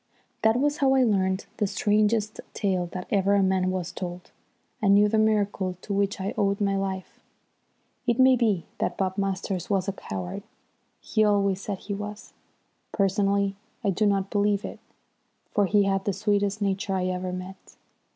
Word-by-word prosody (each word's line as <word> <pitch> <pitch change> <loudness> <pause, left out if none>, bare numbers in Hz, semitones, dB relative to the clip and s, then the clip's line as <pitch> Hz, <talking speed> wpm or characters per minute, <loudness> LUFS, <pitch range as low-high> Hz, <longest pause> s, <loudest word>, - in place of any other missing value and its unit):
That 220 +2 +3
was 290 +2 +1
how 270 -1 +3
I 260 - +5
learnt 190 -4 +1
the 210 - +1
strangest 210 +1 +1 0.2
tale 185 -4 0
that 180 -1 -5
ever 200 0 +3
a 200 - +4
man 190 -1 +2
was 185 -2 -3
told, 180 -1 -7 0.5
and 200 -2 +5
knew 205 +1 +6
the 220 +1 +2
miracle 205 -4 +1
to 205 - -4
which 200 0 0
I 190 +1 -2
owed 200 0 +1
my 200 -1 +1
life. 190 -1 -4 0.9
It 240 -1 +2
may 260 0 +6
be 215 -8 +1
that - - -1
Bob 190 -1 -1
Masters 195 0 -2
was 195 -2 +1
a - - +1
coward. 95 - -5 0.6
He 215 - +1
always 200 -2 +2
said 200 -1 -4
that - - -19
he 205 - -4
was. 210 +1 -7 0.6
Personally 200 0 +1 0.3
I 200 - +2
do 210 +3 +1
not 195 -1 0
believe 205 -1 +1
it, - - -7 0.7
for 205 -1 +2
he 205 +1 +4
had 195 -1 0
the 200 - +1
sweetest 205 +1 0
nature 195 0 -1
I 185 -1 0
ever 185 0 -2
met. 185 +1 -8
200 Hz, 180 wpm, -26 LUFS, 190-210 Hz, 0.9 s, knew